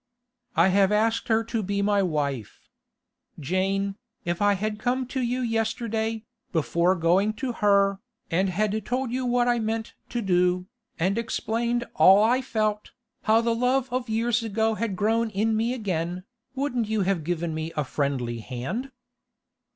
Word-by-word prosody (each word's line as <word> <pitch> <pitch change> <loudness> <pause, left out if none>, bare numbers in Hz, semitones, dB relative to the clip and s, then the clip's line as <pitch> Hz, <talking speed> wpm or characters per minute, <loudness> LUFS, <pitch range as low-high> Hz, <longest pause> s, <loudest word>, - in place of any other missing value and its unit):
'I 170 +4 +5
have 195 +1 +3
asked 225 +2 +1
her 225 -1 +2
to 225 0 -2
be 200 0 -1
my 205 0 +3
wife. 145 - -2 0.8
Jane, 195 +5 -1 0.3
if 175 +1 -2
I 205 0 +4
had 210 +2 -2
come 255 +3 0
to 260 +1 -3
you 250 +1 -1
yesterday, 225 -1 -1 0.3
before 170 +2 +2
going 185 +5 +2
to 250 +4 -3
her, 200 -3 +3 0.3
and 185 +3 +2
had 215 +3 0
told 250 +2 -2
you 255 0 -1
what 245 0 +2
I 240 -1 +2
meant 225 0 -2 0.2
to 240 -1 -2
do, 180 -1 +2 0.3
and 190 +6 +1
explained 235 +1 -1
all 195 +3 +7
I 245 +4 +3
felt, 215 -4 -2 0.4
how 225 +1 +6
the 230 0 +1
love 250 +2 +1
of 255 -2 -2
years 230 +1 +1
ago 225 0 0
had 215 -2 -2
grown 225 +3 +1
in 215 +2 0
me 225 +2 +1
again, 180 -6 -2 0.3
wouldn't 250 -5 -1
you 220 -1 0
have 185 -4 0
given 170 0 -2
me 160 +1 -4
a 150 - +2
friendly 130 -4 -2
hand? 135 - -4
215 Hz, 160 wpm, -26 LUFS, 185-230 Hz, 0.8 s, all